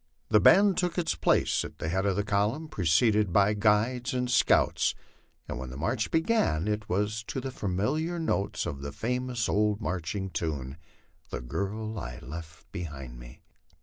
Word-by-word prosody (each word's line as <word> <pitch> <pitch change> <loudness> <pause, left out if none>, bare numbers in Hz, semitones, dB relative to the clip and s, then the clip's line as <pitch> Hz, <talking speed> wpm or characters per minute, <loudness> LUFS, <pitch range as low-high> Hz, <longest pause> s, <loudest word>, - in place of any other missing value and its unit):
The 105 - +6
band 195 - +6
took 180 -1 -1
its 175 - +1
place 80 0 +2
at - - -9
the - - -4
head 95 +4 0
of 95 - +1
the 105 - 0
column, 105 +9 0
preceded 105 - +2
by 100 +3 +4
the 105 - -6
guides 115 +5 +2
and 125 -1 -1
scouts, - - +3 0.5
and - - -5
when 65 -1 -6
the 65 - -8
march 110 - -1
began 160 - +1
it 105 0 -2
was 105 +4 0
to 130 - -4
the 130 +1 -4
familiar 130 - -1
notes 160 -11 -1
of 70 -5 -5
that 70 0 -6
famous 125 0 -1
old 105 0 +1
marching 95 -1 -3
tune, 70 -5 -3 0.3
" - - -37
The - - -4
girl 105 - -3
I - - -6
left 80 +5 -10
behind 70 -10 -7
me." - - -13
105 Hz, 180 wpm, -28 LUFS, 80-120 Hz, 0.5 s, The